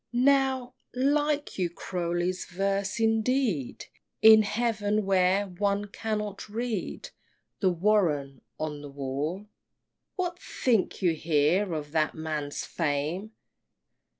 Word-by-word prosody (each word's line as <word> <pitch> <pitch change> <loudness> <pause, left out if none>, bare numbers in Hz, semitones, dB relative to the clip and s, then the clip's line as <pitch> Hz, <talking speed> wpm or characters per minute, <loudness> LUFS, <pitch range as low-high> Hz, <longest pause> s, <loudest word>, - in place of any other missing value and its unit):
XXI. - - +2
Now, 265 -2 +3 0.2
like 290 0 +1
you 180 -2 +1
Croly's 175 +1 -2
verse 195 +3 -1
indeed 225 - +1 0.4
In 220 0 +10
heaven 215 -1 0
where 190 +1 +3
one 200 +2 -1
cannot 210 -1 -4
read 225 -2 -4 0.5
The 190 - +3
"Warren" 165 - +1 0.2
on 150 -2 -4
a - - -7
wall? 140 +7 -3 0.7
What 355 -2 -2
think 225 -5 0
you 175 -2 +4
here 160 +5 +2
of 150 -1 -5
that 155 -1 +1
man's 155 -2 -4
fame? 165 +7 -2
195 Hz, 110 wpm, -28 LUFS, 160-220 Hz, 0.7 s, In